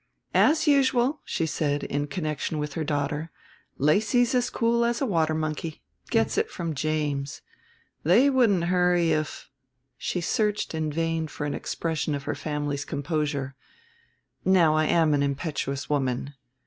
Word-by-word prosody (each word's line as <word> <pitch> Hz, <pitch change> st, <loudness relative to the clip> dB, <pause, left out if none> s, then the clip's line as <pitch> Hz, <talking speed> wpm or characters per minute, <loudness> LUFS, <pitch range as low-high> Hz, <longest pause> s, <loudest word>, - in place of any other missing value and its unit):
"As 315 Hz, +1 st, +4 dB
usual," 275 Hz, -1 st, +3 dB
she 165 Hz, -, -1 dB
said, 145 Hz, -2 st, -1 dB
in 145 Hz, +1 st, -2 dB
connection 155 Hz, 0 st, -3 dB
with 150 Hz, -1 st, -3 dB
her 160 Hz, -, -2 dB
daughter, 145 Hz, +1 st, -2 dB, 0.5 s
"Lacy's 215 Hz, -, +3 dB
as 250 Hz, -1 st, +2 dB
cool 235 Hz, 0 st, +1 dB
as 235 Hz, 0 st, +1 dB
a 275 Hz, -, +1 dB
water 160 Hz, -7 st, +1 dB
monkey; 155 Hz, 0 st, -4 dB, 0.3 s
gets -, -, +2 dB
it 445 Hz, -, 0 dB
from 170 Hz, -2 st, -4 dB
James; 145 Hz, -2 st, -2 dB, 0.6 s
they 205 Hz, -, +5 dB
wouldn't 235 Hz, -10 st, +3 dB
hurry 180 Hz, -1 st, +2 dB
if 155 Hz, -1 st, -2 dB, 0.3 s
" 130 Hz, +1 st, -51 dB
She 180 Hz, -, -2 dB
searched 210 Hz, +3 st, 0 dB
in 155 Hz, -1 st, -1 dB
vain 165 Hz, +1 st, -1 dB
for 150 Hz, -, -5 dB
an 145 Hz, -, -2 dB
expression 160 Hz, -2 st, -2 dB
of 140 Hz, -, -5 dB
her -, -, -2 dB
family's 145 Hz, -2 st, -3 dB
composure. 145 Hz, -2 st, -2 dB, 0.9 s
"Now 180 Hz, -4 st, +4 dB
I 155 Hz, 0 st, +3 dB
am 160 Hz, -1 st, +3 dB
an 145 Hz, -, +2 dB
impetuous 140 Hz, -1 st, -2 dB
woman." 135 Hz, -1 st, -1 dB
155 Hz, 150 wpm, -26 LUFS, 145-185 Hz, 0.9 s, they